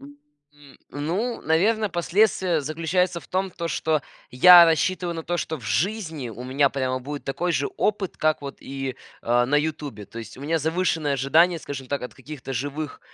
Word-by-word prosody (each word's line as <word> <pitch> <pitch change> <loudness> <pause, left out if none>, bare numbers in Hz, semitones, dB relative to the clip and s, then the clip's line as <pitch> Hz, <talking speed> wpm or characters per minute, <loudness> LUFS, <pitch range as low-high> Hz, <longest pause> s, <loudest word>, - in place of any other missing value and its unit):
М, 145 0 -18
ну, 180 +12 -2
наверное, 210 +7 +2
последствия 180 -1 +2
заключаются 165 +4 0
в - - -18
том, 190 +1 -1
то 170 -1 -5
что 155 +2 0 0.3
я 175 +7 +9
рассчитываю 170 +1 +1
на 165 - -5
то, 175 +2 -2
что 160 -2 -3
в 120 - -14
жизни 155 - -1
у 120 +3 -8
меня 135 +2 +2
прямо 130 -2 -1
будет 145 +3 -7
такой 175 +6 -1
же 140 -2 0
опыт, 205 -3 -1
как 155 -1 +1
вот 140 0 -7
и, 135 -1 -5 0.3
а, 120 +1 +2
на 145 +3 +2
"Ютубе". 145 -8 -3
То 115 - -10
есть 110 -2 -9
у 130 - -12
меня 160 +3 0
завышенные 160 -2 0
ожидания, 160 +6 +3
скажем 135 -4 -7
так, 140 - -2
от 125 - -7
каких-то 135 0 -8
живых 145 +4 -4
150 Hz, 185 wpm, -24 LUFS, 135-175 Hz, 0.3 s, я